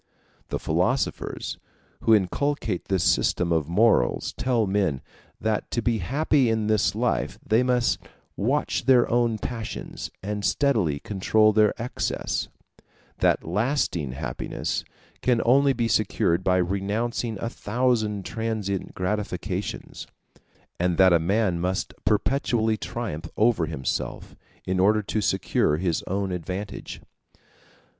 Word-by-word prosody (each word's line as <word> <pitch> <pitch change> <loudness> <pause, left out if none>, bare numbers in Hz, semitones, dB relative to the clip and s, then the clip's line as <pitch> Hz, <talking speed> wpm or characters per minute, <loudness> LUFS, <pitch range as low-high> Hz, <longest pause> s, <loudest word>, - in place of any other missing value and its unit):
The - - -1
philosophers - - -1 0.4
who 115 - +5
inculcate 110 0 -1
this 95 -3 0
system 85 -1 +2
of 80 -2 +1
morals 110 +6 +2
tell 120 -3 +1
men, 95 -8 0 0.4
that 110 -1 -1
to 120 - -1
be 115 -1 +1
happy 135 - +2
in 110 -1 0
this 110 -1 +2
life - - 0
they 110 +3 +3
must 125 -1 +2 0.4
watch 135 +9 0
their 130 -2 +5
own 120 -2 +2
passions 115 0 -5
and 105 +1 -3
steadily 105 - +1
control 110 +3 +2
their 105 -1 +3
excess; 120 +2 -2 0.7
that - - +2
lasting 90 - -1
happiness 65 - -3 0.4
can 120 0 +2
only 135 +3 +5
be 120 -3 0
secured 95 -5 +1
by 90 0 +3
renouncing 105 +5 -1
a - - -2
thousand 110 -4 0
transient 110 -4 -3
gratifications; 95 0 -3 0.7
and 90 -1 +1
that 95 -2 +6
a 85 - +5
man 95 +1 +1
must 95 +3 -2
perpetually 110 0 +1
triumph 110 -8 -5
over 110 -7 +3
himself, 70 -5 -4 0.3
in 95 0 0
order 105 +3 +4
to 110 +1 -1
secure 95 -6 +1
his 85 -1 0
own 95 0 -1
advantage. 90 +3 -5
105 Hz, 120 wpm, -25 LUFS, 95-115 Hz, 0.7 s, that